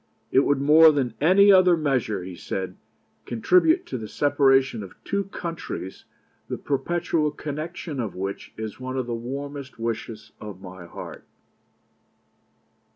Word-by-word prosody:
'It - - +5
would 140 0 +2
more 155 +3 +7
than 135 -6 -1
any 195 +6 +6
other 185 -2 +6
measure,' 130 - 0
he 90 0 -7
said, 95 +1 -4 0.5
'contribute 185 - +3
to - - -5
the 110 - -6
separation 135 -3 +2
of 95 -2 -10
two 200 0 -1
countries 165 - -6 0.4
the - - -4
perpetual 160 +2 0
connection 155 0 -5
of 110 -6 -3
which 95 +1 -5
is 110 0 -6
one 130 +1 -4
of 130 - -1
the 120 - -4
warmest 140 +3 -6
wishes 115 -1 -5
of 105 -3 -8
my 95 -2 -10
heart.' - - -9
135 Hz, 140 wpm, -25 LUFS, 110-160 Hz, 0.5 s, more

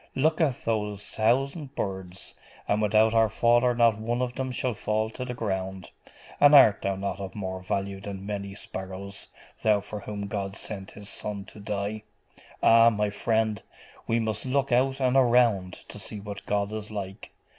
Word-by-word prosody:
Look 155 +4 +2
at 145 -6 +3
those 105 -2 -2
thousand 135 +6 0
birds 95 -1 -5 0.3
and 105 +1 +1
without 110 +1 +4
our 115 -1 +4
Father 120 +2 +3
not 115 -3 +4
one 120 +2 -1
of 125 -1 -3
them 130 0 -3
shall 125 0 -1
fall 110 +1 -1
to 125 - -6
the 125 -1 -5
ground: 95 -4 -3 0.5
and 145 +1 +7
art 110 -8 +7
thou 100 0 -1
not 100 0 -3
of 95 -1 -6
more 95 -2 -4
value 95 +1 -2
than 100 -1 -7
many 100 -1 -4
sparrows, 95 0 -7 0.3
thou 105 -2 +4
for 105 +1 -7
whom 100 0 -5
God 100 -1 -4
sent 95 -2 -6
His 100 -1 -11
Son 100 -2 -4
to 105 - -13
die?.... 105 +1 -3 0.6
Ah, 115 0 +7
my 105 -2 -1
friend, 110 0 0 0.5
we 115 +1 +2
must 110 -2 -2
look 135 +1 0
out 135 +2 +2
and 130 -1 +2
around 120 -8 +4 0.2
to - - -8
see 105 - -5
what 100 0 -8
God 100 0 0
is 110 -1 -5
like. 100 -1 -6
105 Hz, 175 wpm, -27 LUFS, 100-120 Hz, 0.6 s, and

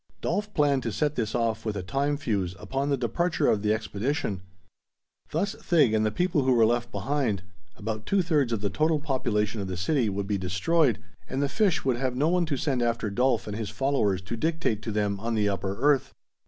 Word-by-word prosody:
Dolf 205 +4 -2
planned 145 -3 +3
to 115 - -3
set 150 +6 0
this 115 -5 -2
off 115 -2 0
with 105 -2 -2
a 95 - -3
time 140 +9 0
fuse, 100 -10 -1
upon 135 +9 -2
the 140 - +2
departure 155 +5 0
of 105 - +3
the 105 0 +1
expedition. 110 - -2 0.9
Thus 195 +6 -1
Thig 150 -10 +2
and 110 0 +2
the 110 - +2
people 175 - +1
who 130 -1 +3
were 115 -2 +5
left 120 +1 0
behind 110 -2 -1 0.3
about 110 0 -4
two 195 -2 +2
thirds 150 -8 +1
of 110 -3 -1
the 100 - -1
total 155 0 +2
population 110 -7 -1
of 95 - -4
the 95 -1 -4
city 115 - +1
would 100 0 -2
be 100 -1 -1
destroyed, 110 - +2 0.3
and 130 - -2
the 140 - +2
fish 195 +1 +1
would 130 -3 +2
have 130 0 -1
no 145 +5 +2
one 175 -1 +2
to 145 -3 -1
send 130 -2 0
after 115 -3 0
Dolf 125 +2 +1
and 105 - -5
his 110 -2 -3
followers 105 -5 0
to 100 +5 -4
dictate 155 -5 -1
to 115 - -4
them 105 -1 0
on 115 +2 -2
the 105 -1 +2
upper 100 0 -2
earth. 140 0 +2
120 Hz, 220 wpm, -27 LUFS, 105-145 Hz, 0.9 s, were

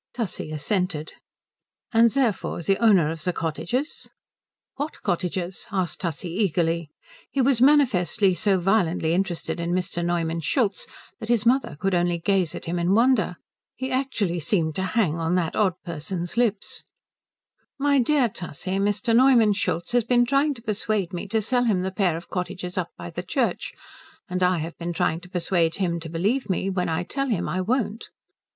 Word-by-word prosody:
Tussie 220 -9 -3
assented. 155 0 -1 0.8
"And 230 0 +5
therefore 230 -8 0
the 195 +3 +1
owner 185 -9 +5
of 165 -1 -6
the 180 - +1
cottages?" 175 - -3 0.7
"What 290 +3 -4
cottages?" 180 +1 -2
asked 185 -3 -2
Tussie, 170 -1 -3
eagerly. 170 -4 0 0.4
He 280 - -3
was 255 -2 +3
manifestly 230 -9 +4
so 195 +2 +2
violently 175 -4 +1
interested 180 -2 -2
in 170 +1 -1
Mr. 180 -1 -1
Neumann 170 -1 -1
Schultz 200 - 0 0.3
that 225 -1 -7
his 235 -3 +2
mother 255 - +2
could 195 0 0
only 175 -1 +2
gaze 180 -1 +1
at - - -7
him 175 +1 -2
in 175 +3 +2
wonder. 235 -5 +3 0.4
He 260 +1 -4
actually 240 -10 -1
seemed 160 -1 0
to - - 0 0.2
hang 170 -7 +2
on 165 +2 0
that 170 -3 0
odd 190 -5 +2
person's 170 +2 -4
lips. 230 -4 -1 0.9
"My 285 0 +3
dear 265 0 +3
Tussie, 185 0 -4
Mr. 205 +4 +1
Neumann 240 -4 +6
Schultz 175 -3 -2
has 245 -1 +3
been 245 +1 +3
trying 280 +3 +2
to 230 - -14
persuade 210 -4 -1
me 175 - -4
to 220 +1 0
sell 245 +2 +1
him 200 -6 +2
the 190 +1 -2
pair 185 -4 +1
of 170 - -10
cottages 180 -1 -4
up 180 -2 -2
by 85 - -7
the - - -4
church, - - -1 0.5
and 180 0 -3
I 180 0 +3
have 165 +1 -5
been 170 0 -3
trying 165 0 0
to 180 - -14
persuade 175 -2 0
him 175 -3 -1
to 165 -1 -8
believe 205 - 0
me 190 +1 0
when 180 -2 -1
I 165 +2 -1
tell 275 +9 -2
him 210 -9 -1
I 185 - -1
won't." 225 +1 -1
190 Hz, 175 wpm, -24 LUFS, 170-230 Hz, 0.9 s, Neumann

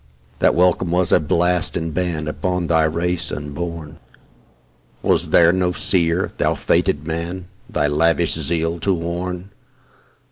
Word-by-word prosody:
That - - +3
welcome 90 0 +2
was 90 +1 +2
a - - +6
blast 85 +3 0
and 80 -1 -4
ban 85 -4 -2
Upon 90 +3 -2
thy 80 -1 +2
race 85 +2 -2
unborn. 75 +1 -6 1.0
Was - - +1
there 85 0 +5
no 90 -1 0
seer, 85 0 +1
thou - - +1
fated 75 +1 0
Man! 85 +3 -4 0.2
Thy 75 - 0
lavish 80 +3 +2
zeal 80 +2 -1
to 95 +2 +1
warn? 90 +2 -4
85 Hz, 135 wpm, -20 LUFS, 80-90 Hz, 1.0 s, a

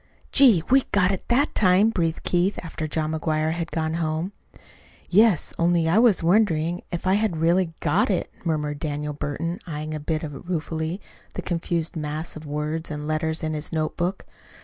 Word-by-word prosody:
"Gee! 235 - +6
we 270 +1 +7
got 190 -2 +3
it 190 - -4
that 270 +5 +2
time!" 195 +2 +4
breathed 165 -5 -1
Keith, 180 +3 +1
after 160 -2 -4
John 155 0 -1
McGuire 155 0 0
had 170 0 -3
gone 160 -1 -2
home. 165 +2 -2 0.8
"Yes; 205 -3 +4
only 170 -1 +3
I 175 +7 +4
was 225 -7 +4
wondering 175 -2 +2
if 175 0 -4
I 185 - +3
had 205 -4 +1
really 170 +2 +2
got 165 +8 +2
it," 190 - -1
murmured 150 -3 -1
Daniel 150 0 -3
Burton, 165 +5 -3
eyeing 155 -1 -4
a 155 - -3
bit 155 +2 -2
ruefully 160 +2 -3 0.4
the - - -4
confused 170 -1 -2
mass 155 +1 -4
of 155 -1 -9
words 150 +2 -3
and 150 -1 -5
letters 160 +1 -1
in 155 0 -1
his 150 0 -3
notebook. 170 +4 -2
165 Hz, 170 wpm, -24 LUFS, 155-180 Hz, 0.8 s, we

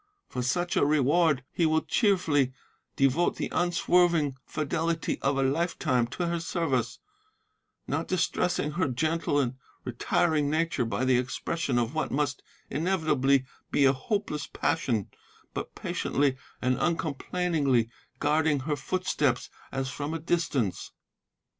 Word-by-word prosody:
For 125 - -3
such 175 +8 0
a - - +3
reward 150 0 +3
he 170 - +2
will 160 0 +2
cheerfully 160 - +2 0.4
devote 135 +6 +2
the - - -3
unswerving 175 -4 +2
fidelity 165 +2 -1
of 140 0 +1
a 135 - +2
lifetime 140 -4 +1
to 175 +8 -3
her 170 0 -1
service, 140 -9 -1 0.9
not - - -2
distressing 175 -3 0
her 175 +2 0
gentle 155 +3 0
and 130 -2 -1 0.3
retiring 145 +4 +1
nature 160 -4 0
by 125 +3 -1
the 130 -1 +4
expression 130 +2 -2
of 120 +2 0
what 155 - -1
must 145 0 -1 0.3
inevitably 150 -6 +2 0.2
be 140 - +3
a 135 - +6
hopeless 150 - -2
passion, 120 - 0 0.5
but - - -5
patiently 140 -1 0 0.3
and 125 0 +2
uncomplainingly 155 -5 +1 0.3
guarding 150 -1 +2
her 150 +2 -1
footsteps 145 -4 -1 0.2
as 135 -1 -2
from 150 +4 -4
a - - -3
distance. 155 - -1
150 Hz, 130 wpm, -28 LUFS, 130-170 Hz, 0.9 s, a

